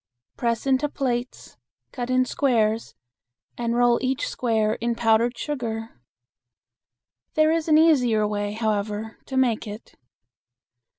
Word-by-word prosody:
Press 235 0 -1
into 270 +2 +2
plates, 250 -3 -4 0.3
cut 245 -2 -5
in 255 0 +3
squares, 230 -5 0 0.6
and 235 -1 -2
roll 240 0 +3
each 265 +1 -1
square 220 -3 0
in 235 0 0
powdered 230 +1 +2
sugar. 225 - -5 1.3
There 310 0 +4
is 325 -1 0
an 310 -1 +5
easier 250 -10 +4
way, 205 0 -2
however, 215 0 -2
to 265 - -3
make 240 -4 +1
it. 210 +2 -9
235 Hz, 120 wpm, -24 LUFS, 220-260 Hz, 1.3 s, an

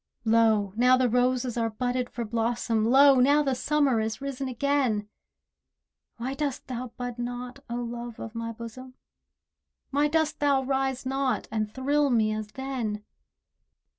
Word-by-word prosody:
Lo! 220 -3 +3
now 250 +2 +5
the 255 -1 +3
roses 250 0 +1
are 230 -1 +1
budded 245 +2 -2
for 235 - -4
blossom— 225 0 0
Lo! 275 +1 +7
now 285 +4 +5
the 270 -2 0
Summer 280 -2 +1
is 220 0 -2
risen 275 -1 -4
again. 255 -5 0 1.1
Why 250 +3 -3
dost 280 -2 -3
thou 255 0 -5
bud 245 -1 -5
not, 245 +2 -5
O 235 - -3
Love 240 -1 -5
of 225 - -7
my 230 0 -4
bosom? 235 +3 -9 1.0
Why 290 +2 +3
dost 315 0 0
thou 280 -2 +2
rise 265 -1 -1
not, 270 0 -1
and 215 -1 -2
thrill 285 +4 +1
me 220 -3 +2
as 215 -1 -4
then? 245 -6 -3
250 Hz, 150 wpm, -27 LUFS, 230-270 Hz, 1.1 s, Lo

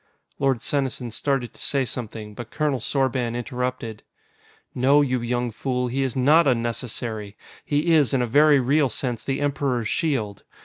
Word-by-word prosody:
Lord 135 -4 +1
Senesin 130 -4 -1
started 135 0 -1
to - - -14
say 135 -2 +1
something, 110 -3 -6
but 120 +2 -8
Colonel 145 -2 0
Sorban 125 -1 0
interrupted. 125 -2 -4 0.7
"No, 140 +4 +4
you 130 -3 0
young 120 0 -1
fool, 125 +2 -2
he 135 +3 -1
is 135 -3 -1
not 150 +5 +5
unnecessary! 115 -3 -2 0.3
He 155 +3 +1
is, 150 -5 +4
in 130 -3 +2
a - - +1
very 145 +4 +5
real 140 +2 +2
sense, 120 0 -3
the 135 0 -2
Emperor's 140 -5 0
shield. 120 - -1
125 Hz, 160 wpm, -24 LUFS, 120-140 Hz, 0.7 s, not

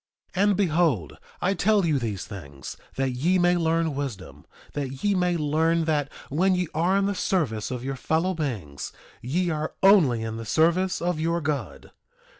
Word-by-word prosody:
2:17 190 - 0
And 205 -2 +3
behold, 155 - +1 0.3
I 190 - +3
tell 205 -1 +2
you 150 -4 +2
these 110 -6 -3
things 70 -10 -9 0.2
that 135 -1 0
ye 160 +10 +1
may 175 0 +4
learn 165 -2 +1
wisdom; 135 -9 -6 0.3
that 135 -2 -4
ye 205 - +3
may 180 -2 +1
learn 160 +2 +1
that 145 -3 0 0.2
when 185 +6 +2
ye 180 -1 0
are 175 +5 +2
in 200 - +2
the 200 - 0
service 145 - -1
of 125 -1 -4
your 135 0 -2
fellow 165 +7 0
beings 110 - -4 0.3
ye 170 +8 0
are 155 0 -3
only 160 - +5
in 110 0 -4
the 115 - -5
service 170 - +2
of 175 -2 0
your 165 +2 0
God. 145 -6 -4
160 Hz, 180 wpm, -25 LUFS, 130-180 Hz, 0.3 s, only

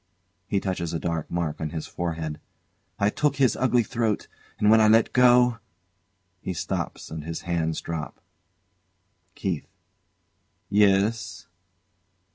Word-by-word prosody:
[He 100 - +1
touches 85 -4 -3
a - - -1
dark 85 -2 -3
mark 85 -3 -2
on 80 - -2
his 80 0 -5
forehead] 80 -3 -4 0.6
I 100 +1 +2
took 150 +3 +1
his 135 -3 +3
ugly 125 -1 +2
throat, 115 -2 -1 0.3
and 105 0 +4
when 110 0 +7
I 110 - +6
let 110 +1 +4
go 125 -1 +5 0.8
[He 95 - -3
stops - - -4
and 80 -1 -5
his 80 +1 -5
hands 80 -2 -1
drop.] 80 -2 -5 1.2
KEITH. 90 -7 -3 1.0
Yes? 105 +2 +2
95 Hz, 125 wpm, -25 LUFS, 80-115 Hz, 1.2 s, when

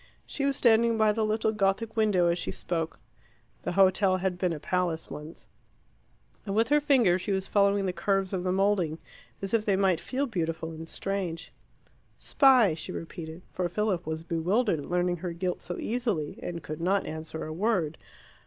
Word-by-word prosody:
She 275 - -3
was 275 -1 +1
standing 230 -2 +4
by 215 -1 +4
the 220 +1 0
little 215 0 +1
Gothic 215 +2 0
window 210 -5 +3
as 170 +1 +2
she - - -4
spoke 165 -2 -3 0.6
the - - -3
hotel 190 0 +4
had 185 -1 -2
been 180 -1 +1
a 160 - -4
palace 175 0 -2
once 150 +3 -9 1.0
and 195 -1 -3
with 225 +2 +2
her 295 0 +4
finger 240 -11 +4
she 200 - -3
was 190 -1 0
following 200 0 +2
the 185 - -1
curves 195 0 0
of 185 - -1
the 185 - 0
moulding 190 -4 +1 0.5
as 195 - -4
if 225 -2 +3
they 200 -2 +2
might 190 -3 +2
feel 270 +2 -1
beautiful 165 - -3
and 160 0 -8
strange. 190 -4 -3 0.7
"Spy," 255 - +5
she 160 - -6
repeated, 165 0 -7
for 180 -1 -1
Philip 190 -2 -1
was 160 0 -3
bewildered 175 +3 +1
at 145 - -8
learning 175 0 +1
her 175 0 -4
guilt 180 +1 -2
so 175 - -5
easily, 220 -11 -2
and 170 -3 -5
could 155 +2 -6
not 190 +3 +1
answer 160 0 -5
a 155 - -5
word. 175 -4 0
185 Hz, 185 wpm, -28 LUFS, 170-215 Hz, 1.0 s, Spy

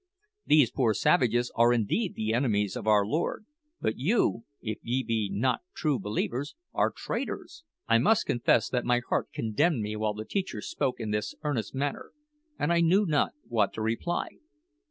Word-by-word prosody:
These 145 -6 +5
poor 115 -5 +1
savages 120 0 +2
are 120 +1 +5
indeed 120 - 0
the 110 0 -1
enemies 105 -5 +1
of - - -5
our 105 -2 +5
Lord; 160 - -2 0.3
but 110 - -2
you, 150 - +1
if 110 -2 -4
ye 130 +3 -1
be 110 -3 -1
not 115 +5 0
true 150 -5 0
believers, 120 - -3 0.2
are - - +2
traitors!" - - -5 0.2
I 115 0 +5
must 220 - +3
confess 120 -2 +2
that 125 -1 0
my 120 0 +2
heart - - 0
condemned 120 +5 +1
me 105 +1 -3
while 105 -1 -1
the 110 +1 -6
teacher 190 - -3
spoke 130 +4 -2
in 110 -2 -3
this 105 0 -2
earnest 130 -7 -2
manner, 140 +1 -3 0.4
and 165 +4 +1
I 170 - +3
knew 185 +5 +4
not 150 -5 +1
what 115 -2 +1
to 110 - -4
reply. 115 +11 -1
120 Hz, 175 wpm, -28 LUFS, 110-145 Hz, 0.4 s, These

